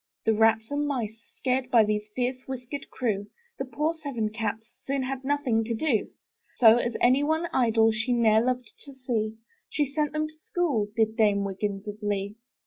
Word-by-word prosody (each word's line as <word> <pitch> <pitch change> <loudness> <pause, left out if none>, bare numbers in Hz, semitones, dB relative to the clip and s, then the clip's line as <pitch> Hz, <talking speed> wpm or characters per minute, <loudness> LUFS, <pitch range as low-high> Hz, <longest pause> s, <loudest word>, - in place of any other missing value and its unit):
The 225 - +4
rats 225 +1 +3
and 290 0 0
mice 225 -5 -3 0.2
scared 255 -1 0
By 235 -3 +6
this 210 0 -1
fierce 255 +1 -2
whiskered 265 +2 -6
crew, 205 -5 -2 0.3
The - - -2
poor 300 +5 -1
seven 280 -9 -3
cats 225 +1 -4
Soon 275 -1 -2
had 265 0 -4
nothing 265 -5 +1
to 230 0 -2
do; 230 -3 0 0.5
So, 230 -2 +8
as 240 -1 -1
any 255 +3 +4
one 315 +3 +1
idle 225 -3 +4
She 225 +3 -2
ne'er 225 -2 +4
loved 250 -1 -1
to 280 -2 -11
see, 225 -4 -2 0.3
She 295 - +1
sent 295 +2 -1
them 310 0 0
to 310 - -13
school. 310 -8 -1
Did 220 -1 +2
Dame 205 -3 +3
Wiggins 200 +1 -3
of 210 +1 -7
Lee. 205 0 -2
235 Hz, 185 wpm, -27 LUFS, 220-270 Hz, 0.5 s, So